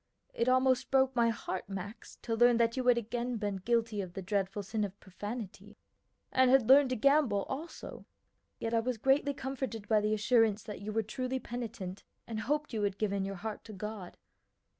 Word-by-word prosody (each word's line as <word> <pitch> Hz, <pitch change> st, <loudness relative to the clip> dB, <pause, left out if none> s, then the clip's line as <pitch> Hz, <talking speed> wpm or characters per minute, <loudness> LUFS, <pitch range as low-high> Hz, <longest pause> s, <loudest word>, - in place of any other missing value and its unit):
It 235 Hz, +2 st, +1 dB
almost 255 Hz, 0 st, +3 dB
broke 265 Hz, -1 st, +3 dB
my 235 Hz, -1 st, +4 dB
heart, 195 Hz, -4 st, -4 dB
Max, 200 Hz, +3 st, -7 dB
to 230 Hz, -, -2 dB
learn 240 Hz, +1 st, +5 dB
that 230 Hz, 0 st, +2 dB
you 260 Hz, -, -1 dB
had 245 Hz, -1 st, +6 dB
again 235 Hz, +1 st, -2 dB
been 205 Hz, -2 st, -2 dB
guilty 225 Hz, +1 st, 0 dB
of 180 Hz, -2 st, -7 dB
the 195 Hz, -, -6 dB
dreadful 200 Hz, +1 st, -1 dB
sin 215 Hz, +2 st, -2 dB
of 200 Hz, -1 st, -5 dB
profanity, 205 Hz, +1 st, -7 dB, 0.5 s
and 260 Hz, -1 st, +4 dB
had 260 Hz, -3 st, +5 dB
learned 275 Hz, 0 st, +7 dB
to 255 Hz, -, 0 dB
gamble 270 Hz, -5 st, +3 dB
also; 305 Hz, +6 st, -7 dB, 0.5 s
yet 225 Hz, -, -3 dB
I 230 Hz, -, +4 dB
was 245 Hz, +1 st, -1 dB
greatly 270 Hz, +4 st, +2 dB
comforted 260 Hz, -6 st, -4 dB
by 215 Hz, -1 st, +4 dB
the 210 Hz, +1 st, +1 dB
assurance 220 Hz, -1 st, +3 dB
that 210 Hz, -4 st, -7 dB
you 210 Hz, +1 st, -4 dB
were 220 Hz, +1 st, 0 dB
truly 255 Hz, +4 st, -3 dB
penitent, 225 Hz, -7 st, -6 dB, 0.2 s
and 225 Hz, -2 st, -4 dB
hoped 295 Hz, +3 st, -1 dB
you 220 Hz, -, -1 dB
had 200 Hz, -1 st, 0 dB
given 200 Hz, -2 st, 0 dB
your 195 Hz, 0 st, -4 dB
heart 215 Hz, +3 st, -6 dB
to 220 Hz, -, -9 dB
God. 210 Hz, -2 st, -7 dB
225 Hz, 195 wpm, -32 LUFS, 205-255 Hz, 0.5 s, learned